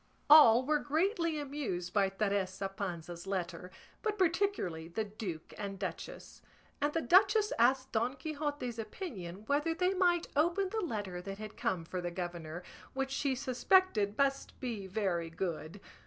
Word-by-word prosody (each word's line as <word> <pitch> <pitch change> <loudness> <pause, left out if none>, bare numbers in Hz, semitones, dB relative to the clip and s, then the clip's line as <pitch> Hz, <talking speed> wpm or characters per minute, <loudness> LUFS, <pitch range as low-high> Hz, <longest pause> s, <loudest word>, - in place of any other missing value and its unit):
All 260 -5 +9
were 300 +1 +2
greatly 335 +2 0
amused 265 -12 -4
by 200 -2 +3
Teresa 195 -1 -1
Panza's 175 -2 -6
letter, 180 -2 -3 0.3
but 425 -1 -1
particularly 340 - 0
the 195 +6 -2
duke 200 -6 -6
and 200 -1 -4
duchess; - - -6 0.4
and 290 +1 +2
the 325 +1 -1
duchess 415 +3 +5
asked 260 +2 +3
Don 235 +4 0
Quixote's 290 -6 -4
opinion 210 - -6
whether 295 +6 +1
they 365 +2 +2
might 350 -2 +2
open 345 +6 +2
the 440 +2 -2
letter 205 - -3
that 195 +1 -6
had 215 0 -8
come 170 -3 -1
for 180 +2 -4
the 175 - -2
governor, 175 -1 -5 0.3
which 270 0 -2
she 275 -1 0
suspected 255 - +2
must 275 0 0
be 225 -7 -4
very 185 -4 -1
good. 165 0 -4
225 Hz, 150 wpm, -33 LUFS, 185-305 Hz, 0.4 s, All